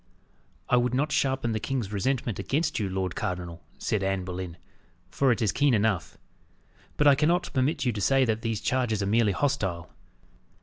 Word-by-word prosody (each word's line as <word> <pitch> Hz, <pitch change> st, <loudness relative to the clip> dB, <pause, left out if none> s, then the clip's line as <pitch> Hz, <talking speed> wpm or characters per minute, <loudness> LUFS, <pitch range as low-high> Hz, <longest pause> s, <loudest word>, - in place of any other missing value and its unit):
"I 125 Hz, -, +3 dB
would 125 Hz, 0 st, +1 dB
not 145 Hz, +3 st, 0 dB
sharpen 130 Hz, -4 st, 0 dB
the 110 Hz, -, -1 dB
king's 120 Hz, -5 st, -3 dB
resentment 120 Hz, +1 st, -1 dB
against 150 Hz, +9 st, -1 dB
you, 100 Hz, -3 st, -1 dB
lord 95 Hz, -1 st, -2 dB
cardinal," 90 Hz, -2 st, -4 dB, 0.2 s
said 105 Hz, -, -1 dB
Anne 95 Hz, -1 st, -1 dB
Boleyn, 90 Hz, -2 st, -6 dB, 0.5 s
"for 135 Hz, -2 st, +2 dB
it 115 Hz, 0 st, 0 dB
is 105 Hz, -, +2 dB
keen 140 Hz, 0 st, +3 dB
enough; 100 Hz, -6 st, 0 dB, 0.8 s
but 150 Hz, -, +2 dB
I 145 Hz, -, +8 dB
cannot 160 Hz, +6 st, +1 dB
permit 135 Hz, +2 st, 0 dB
you 125 Hz, -, +2 dB
to 105 Hz, -, -4 dB
say 135 Hz, +4 st, +3 dB
that 110 Hz, -1 st, -1 dB
these 115 Hz, -2 st, -2 dB
charges 120 Hz, -5 st, 0 dB
are -, -, -1 dB
merely 110 Hz, +1 st, +3 dB
hostile. 95 Hz, -, -1 dB
115 Hz, 180 wpm, -27 LUFS, 95-135 Hz, 0.8 s, I